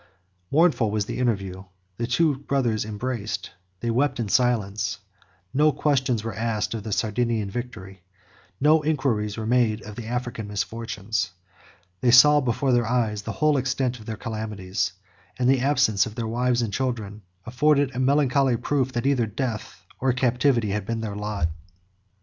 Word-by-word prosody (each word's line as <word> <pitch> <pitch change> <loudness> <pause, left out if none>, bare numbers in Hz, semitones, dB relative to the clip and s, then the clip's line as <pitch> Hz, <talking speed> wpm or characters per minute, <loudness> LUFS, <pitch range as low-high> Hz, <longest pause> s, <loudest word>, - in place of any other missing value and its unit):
Mournful 155 -8 +3
was 105 -1 -1
the - - -5
interview: 100 -6 -1 0.3
the 115 - -2
two 145 +4 +2
brothers 130 -6 -1
embraced; 110 0 -4 0.3
they 115 - 0
wept 130 +3 +1
in 110 -3 -2
silence; 105 -5 +1 0.6
no 150 +3 +4
questions 130 -5 +1
were 115 - -4
asked 110 -1 -1
of 115 - -4
the 110 +1 -6
Sardinian 110 -1 0
victory; 95 -6 -7 0.6
no 155 +2 +5
inquiries 130 -9 0
were 110 - -3
made 115 -2 +2
of 105 -1 -9
the 115 -1 -7
African 120 -3 -3
misfortunes: 105 -1 -3 0.7
they 125 - +2
saw 145 +4 +8
before 130 +2 0
their 120 -2 +2
eyes 110 -4 0
the - - -5
whole 150 -1 +2
extent 130 -1 -1
of 110 - -13
their 110 -1 -4
calamities; 105 -5 -3 0.5
and 125 - +1
the 135 0 +4
absence 120 -8 +3
of 110 - -9
their 115 -2 -3
wives 120 +1 +1
and 105 -3 -3
children 110 -4 -3 0.2
afforded 140 +2 +2
a - - -2
melancholy 135 -1 +3
proof 130 +1 0
that 120 +1 -2
either 130 -5 +2
death 110 0 -5
or 130 -1 +2
captivity 125 -3 +2
had 105 +1 -1
been 115 +2 -3
their 105 -2 -4
lot. 105 -4 -1
120 Hz, 160 wpm, -24 LUFS, 105-130 Hz, 0.7 s, saw